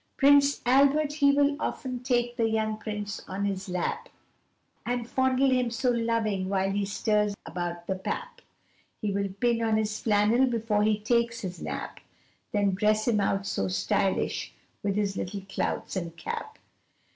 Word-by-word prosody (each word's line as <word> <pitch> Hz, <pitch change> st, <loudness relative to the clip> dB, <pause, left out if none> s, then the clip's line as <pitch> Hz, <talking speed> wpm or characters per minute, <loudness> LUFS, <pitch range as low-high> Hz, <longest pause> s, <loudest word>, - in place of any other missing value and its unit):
Prince 285 Hz, 0 st, +5 dB
Albert 280 Hz, +4 st, +4 dB
he 285 Hz, -2 st, +4 dB
will 285 Hz, 0 st, +3 dB
often 255 Hz, -4 st, -3 dB
take 240 Hz, -1 st, 0 dB
the 225 Hz, -1 st, +1 dB
young 220 Hz, -1 st, 0 dB
Prince 210 Hz, -2 st, -5 dB
on 195 Hz, +2 st, -2 dB
his 195 Hz, -1 st, -3 dB
lap, 440 Hz, -, -2 dB, 0.7 s
And 245 Hz, -1 st, -2 dB
fondle 260 Hz, +1 st, +2 dB
him 250 Hz, -2 st, +2 dB
so 240 Hz, +2 st, 0 dB
loving 225 Hz, -5 st, 0 dB
while 195 Hz, 0 st, +1 dB
he 200 Hz, 0 st, 0 dB
stirs 210 Hz, 0 st, +1 dB
about 175 Hz, 0 st, -4 dB
the 190 Hz, -, -1 dB
pap, 475 Hz, -, -5 dB, 0.6 s
He 210 Hz, -, -1 dB
will 200 Hz, 0 st, -1 dB
pin 230 Hz, +4 st, 0 dB
on 220 Hz, -1 st, +2 dB
his 215 Hz, 0 st, -1 dB
flannel 220 Hz, +4 st, +3 dB
before 225 Hz, -3 st, 0 dB
he 215 Hz, 0 st, +3 dB
takes 235 Hz, +1 st, +1 dB
his 180 Hz, -3 st, -6 dB
nap, -, -, -5 dB, 0.5 s
Then 205 Hz, -2 st, +2 dB
dress 215 Hz, +3 st, +2 dB
him 220 Hz, -3 st, +3 dB
out 195 Hz, 0 st, 0 dB
so 95 Hz, -, -1 dB
stylish 95 Hz, -, 0 dB, 0.3 s
with 200 Hz, -1 st, -1 dB
his 205 Hz, -2 st, 0 dB
little 195 Hz, +2 st, -4 dB
clouts 195 Hz, -, -2 dB
and 170 Hz, -3 st, -4 dB
cap. 160 Hz, -, -5 dB
215 Hz, 160 wpm, -28 LUFS, 195-245 Hz, 0.7 s, Prince